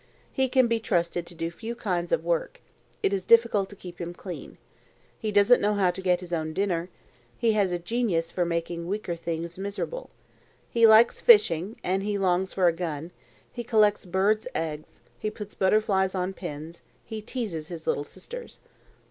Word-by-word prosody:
He 265 -1 +1
can 260 0 +4
be 230 -1 +1
trusted 175 -5 -1
to 175 - -10
do 165 0 -3
few 225 +7 -6
kinds 180 -6 -2
of - - +1
work. - - -1 0.4
It 195 - +2
is 195 -2 -1
difficult 230 -3 +4
to 200 - -11
keep 180 -2 -10
him 175 0 -5
clean. 180 -1 -8 0.6
He 215 -2 -2
doesn't 205 +4 +5
know 210 +1 +2
how 190 -3 +3
to 185 +2 -7
get 180 -1 +2
his 175 -1 -7
own 160 -1 -2
dinner. 180 -2 -1 0.5
He 230 - +2
has 205 -4 +2
a 175 - 0
genius 175 -3 -1
for 180 - 0
making 170 0 -2
weaker 195 -2 -2
things 170 +1 -5
miserable. 200 - -4 0.6
He 230 -1 +6
likes 220 +2 +6
fishing, 210 - +5
and 190 +2 0
he 205 0 -1
longs 185 -1 +1
for 185 - +1
a 170 - +5
gun; 165 -1 -4 0.4
he 240 - -5
collects 215 -4 +3
birds' 200 +5 +1
eggs; 155 -2 -4 0.2
he 215 - -1
puts 210 -1 -9
butterflies 190 -1 +2
on 185 +1 -1
pins; 165 -2 -7 0.2
he 220 -1 -6
teases 205 - -4
his 165 -2 -8
little 145 - 0
sisters." 470 - -9
190 Hz, 180 wpm, -27 LUFS, 170-215 Hz, 0.6 s, He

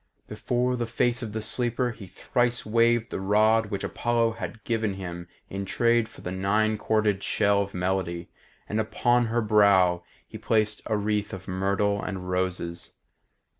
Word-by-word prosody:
Before 125 +1 -1
the 120 -1 -2
face 120 +1 0
of 115 -3 -5
the 110 0 -4
sleeper 120 +2 0
he 105 -4 -11
thrice 120 +6 -1
waved 115 +1 +2
the - - -3
rod 110 +3 +3
which 100 -2 -4
Apollo 120 -1 +1
had 110 -1 -7
given 110 -4 -1
him 85 -2 -7 0.2
in 100 +1 -4
trade 115 +4 +2
for - - -15
the 90 - -5
nine 105 +4 +1
corded 105 -3 +1
shell 100 -1 +2
of 100 -1 -5
melody, 90 -2 -2 0.4
and 105 - -1
upon 120 +2 +2
her 115 +1 0
brow 100 -5 +4 0.2
he - - -9
placed 110 -1 +1
a 110 - +1
wreath 105 0 -1
of 95 -1 -8
myrtle 100 +2 0
and 90 -3 -5
roses. 90 -2 -3
105 Hz, 165 wpm, -26 LUFS, 95-115 Hz, 0.4 s, brow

